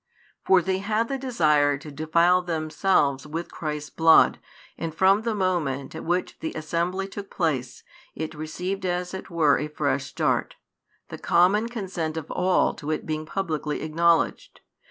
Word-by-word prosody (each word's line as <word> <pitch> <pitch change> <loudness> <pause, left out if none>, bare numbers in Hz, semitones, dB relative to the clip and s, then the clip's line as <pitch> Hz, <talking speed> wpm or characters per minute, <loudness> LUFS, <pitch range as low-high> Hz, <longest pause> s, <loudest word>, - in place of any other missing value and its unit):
For 185 -2 +4
they 190 +2 0
had 215 +3 -1
the 270 -1 -2
desire 150 - +2
to 150 +2 -10
defile 170 +5 +3
themselves 155 -4 0
with 165 +3 -5
Christ's 150 -3 -5
|135 - - -39
Blood, 160 0 +6 0.4
and 165 -1 -5
from 195 +4 +4
the 225 -1 -2
moment 170 -9 -1
at 160 - -7
which 175 +2 -2
the 160 - -4
assembly 170 +4 -2
took 195 0 -8
place, 135 -8 -2 0.3
it 160 0 -4
received 180 +5 -4
as 180 0 -2
it 190 - -7
were 160 -5 +3
a 150 - -2
fresh 140 -3 -1
start, - - -1 0.5
the - - -8
common 195 +6 +3
consent 180 -8 -4
of 160 -1 -6
all 180 0 +2
to 150 - -8
it 155 - -2
being 155 0 -3
publicly 155 -6 -3
acknowledged. 165 +2 +1
165 Hz, 160 wpm, -25 LUFS, 155-190 Hz, 0.5 s, Blood